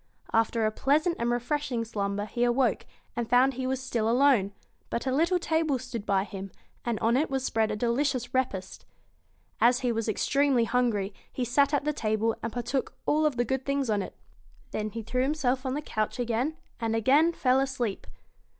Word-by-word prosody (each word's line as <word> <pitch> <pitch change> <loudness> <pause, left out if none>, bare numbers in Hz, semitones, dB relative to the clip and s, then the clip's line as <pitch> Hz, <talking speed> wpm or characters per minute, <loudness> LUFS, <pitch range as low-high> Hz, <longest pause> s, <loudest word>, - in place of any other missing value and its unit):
After 225 0 +2
a 215 - +2
pleasant 305 +9 +2
and 235 - 0
refreshing 245 0 -1
slumber 205 -2 -2
he 240 +3 -2
awoke, 245 -1 +1 0.3
and 235 -1 -2
found 255 +3 +5
he 260 +1 -3
was 265 0 -1
still 235 -4 -1
alone; 245 -5 +4 0.4
but 235 - -2
a 260 - 0
little 335 +7 +2
table 320 -4 +1
stood 240 -4 -6
by 195 -1 +2
him, 195 -1 -7 0.3
and 235 -2 -1
on 230 +2 +3
it 295 +5 +1
was 265 -1 -1
spread 225 -3 +1
a 215 - -1
delicious 245 +2 0
repast. 200 -8 -2 0.8
As 245 +2 +4
he 250 -2 +1
was 225 -1 -1
extremely 275 +3 +2
hungry, 225 -4 0 0.2
he 250 - -2
sat 280 +4 +3
at 290 -2 +1
the 300 - +1
table, 220 -2 0
and 230 - -3
partook 245 +4 -2
of - - -33
all 305 0 +3
the 245 -4 -1
good 265 +2 -1
things 275 -3 0
on 205 -1 +1
it. 190 - -7 0.6
Then 215 0 -2
he 225 +2 -6
threw 250 +4 -1
himself 265 -2 0
on 260 - -1
the 300 - -3
couch 215 -6 -2
again, 245 +6 -1 0.2
and 225 -1 -1
again 280 +9 +4
fell 260 -5 +2
asleep. 255 -6 -2
245 Hz, 195 wpm, -28 LUFS, 225-270 Hz, 0.8 s, found